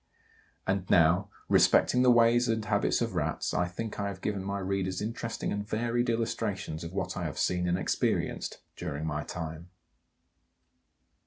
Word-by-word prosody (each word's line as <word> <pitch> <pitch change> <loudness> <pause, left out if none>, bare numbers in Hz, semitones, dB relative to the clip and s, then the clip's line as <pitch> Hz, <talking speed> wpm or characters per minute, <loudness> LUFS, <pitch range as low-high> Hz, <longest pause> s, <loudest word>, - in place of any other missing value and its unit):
And 95 -1 -1
now, 90 +4 +4 0.2
respecting 125 - +4
the 125 - +5
ways 120 0 +5
and 110 -2 0
habits 100 -1 +1
of - - -1
Rats - - -1
I 90 - +1
think 105 +5 -5
I 100 - -1
have 100 -2 -5
given 100 -1 -2
my 100 +1 -2
readers 95 -1 -1
interesting 115 +2 -3
and 105 0 -2
varied 120 +3 0
illustrations 115 -8 -2
of 85 - -6
what 95 -1 -3
I 90 - -3
have 75 - -4
seen 90 -1 +1
and 90 0 +2
experienced - - -1
during 75 +2 -4
my 75 -1 -2
time. 80 +1 -6
100 Hz, 160 wpm, -29 LUFS, 90-115 Hz, 0.2 s, the